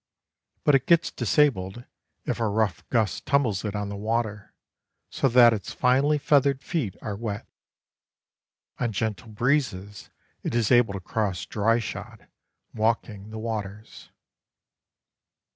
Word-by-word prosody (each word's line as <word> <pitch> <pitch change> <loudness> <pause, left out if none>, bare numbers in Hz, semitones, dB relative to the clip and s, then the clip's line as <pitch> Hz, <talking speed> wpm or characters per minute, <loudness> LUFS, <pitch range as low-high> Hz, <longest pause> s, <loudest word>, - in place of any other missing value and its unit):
But 150 - +4
it 135 - +3
gets 170 -1 +4
disabled 120 -7 +1 0.4
if - - -2
a 115 - +1
rough 105 -4 0
gust 110 -5 0
tumbles 120 -9 +1
it 105 -1 -3
on 105 -1 -3
the 100 - -5
water 110 0 -3 0.6
so - - +1
that 120 -1 +7
its 100 -4 -5
finely 135 +4 +3
feathered 140 -2 +2
feet 140 - -2
are 105 - -3
wet. 105 0 -5 1.3
On 120 -2 0
gentle 105 -2 -3
breezes 105 -4 -1 0.3
it - - -3
is 115 -1 +1
able 120 -4 +5
to 100 - -4
cross 95 -2 -2
dry 115 +2 +1
shod, 115 - -7 0.5
walking 110 -2 -1
the 110 - -7
waters. 110 -2 -6
110 Hz, 130 wpm, -26 LUFS, 105-125 Hz, 1.3 s, that